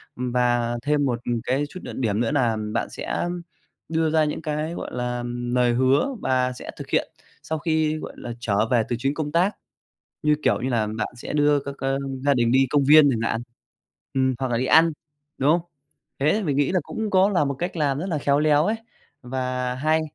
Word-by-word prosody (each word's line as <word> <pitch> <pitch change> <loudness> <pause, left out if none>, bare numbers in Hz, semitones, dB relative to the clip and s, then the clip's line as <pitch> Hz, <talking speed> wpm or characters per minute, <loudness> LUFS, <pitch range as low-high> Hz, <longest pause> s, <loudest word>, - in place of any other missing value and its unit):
Ừm, 125 0 -3
và 120 -1 +1
thêm 145 -1 +2
một 120 -3 0 0.2
cái 135 +4 0
chút 185 - -8
nữa - - -7
điểm 110 -4 0
nữa 120 +4 +1
nà 120 -6 +2 0.2
bạn 115 - -1
sẽ - - -3 0.6
đưa 160 -1 +1
ra 160 0 +3
những 150 +1 -3
cái, 155 +2 -2
gọi - - -6
là, 125 0 -2
lời 120 0 0
hứa 135 - +2
và 130 -1 +1
sẽ - - -8
thực - - -8
hiện - - 0 0.3
sau 160 -1 -3
khi, 155 -1 +1
gọi - - -7
là, 120 - -6
trở 110 -1 +1
về 115 -2 +4
từ 120 - 0
chuyến 135 +3 0
công 150 -1 -3
tác. 180 +5 +2 0.7
Như, 150 0 +4
kiểu - - +2
như 130 - -1
là, 110 -3 +1
bạn 110 0 -2
sẽ - - -6
đưa 145 -1 +3
các, 140 0 -7
ơ, 135 0 -1 0.3
gia 140 - +5
đình 120 -2 +2
đi 135 +1 +5
công 145 -2 +3
viên 150 0 +7
chẳng 115 -2 -1
hạn. 115 - -2 0.7
Ừm, 130 -1 +2
hoặc 130 -2 -2
là 115 - +1
đi 130 - 0
ăn, 165 +3 +5 0.5
đúng 140 +2 +2
không? 170 +1 +3 0.6
Thế 155 +10 +2
mình 145 -4 0
nghĩ 145 +3 +2
là 185 - +2
cũng 220 -1 -4
có 190 +1 +4
là 175 -7 +2
một 140 - -1
cách 175 +2 -3
làm 145 -3 0
rất 180 - -3
là 165 - -1
khéo 140 0 +2
léo 150 +1 +3
ấy 215 - +1 0.5
và 125 0 -2
hay. 155 +4 +1
140 Hz, 220 wpm, -24 LUFS, 125-155 Hz, 0.7 s, viên